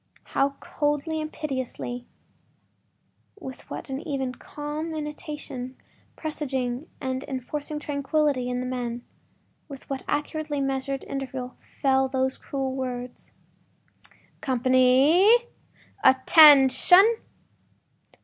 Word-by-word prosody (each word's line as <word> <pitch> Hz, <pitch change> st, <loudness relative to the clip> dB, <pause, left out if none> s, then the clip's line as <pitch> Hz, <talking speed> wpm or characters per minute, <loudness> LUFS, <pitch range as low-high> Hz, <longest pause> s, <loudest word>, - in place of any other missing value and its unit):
How 275 Hz, 0 st, +1 dB
coldly 295 Hz, +2 st, -1 dB
and 310 Hz, 0 st, -5 dB
pitilessly—with 260 Hz, -4 st, -4 dB, 1.7 s
what -, -, -6 dB
an 270 Hz, +1 st, -4 dB
even, 275 Hz, -6 st, -3 dB
calm 300 Hz, +4 st, -6 dB
intonation, 295 Hz, -4 st, -6 dB, 0.4 s
presaging, 265 Hz, -3 st, -3 dB
and 260 Hz, -1 st, -3 dB
enforcing 290 Hz, +3 st, -4 dB
tranquility 285 Hz, -3 st, 0 dB
in 250 Hz, 0 st, -2 dB
the -, -, -4 dB
men—with 250 Hz, +3 st, -8 dB
what 270 Hz, -, -2 dB
accurately 295 Hz, 0 st, -2 dB
measured 270 Hz, 0 st, -2 dB
interval 260 Hz, -2 st, -5 dB
fell 265 Hz, -1 st, 0 dB
those 260 Hz, 0 st, -1 dB
cruel 270 Hz, -2 st, -3 dB
words: 250 Hz, -2 st, -5 dB, 1.1 s
“Company!… 260 Hz, -, +4 dB, 0.7 s
Attention! 300 Hz, -, +7 dB
270 Hz, 85 wpm, -25 LUFS, 260-300 Hz, 1.7 s, Attention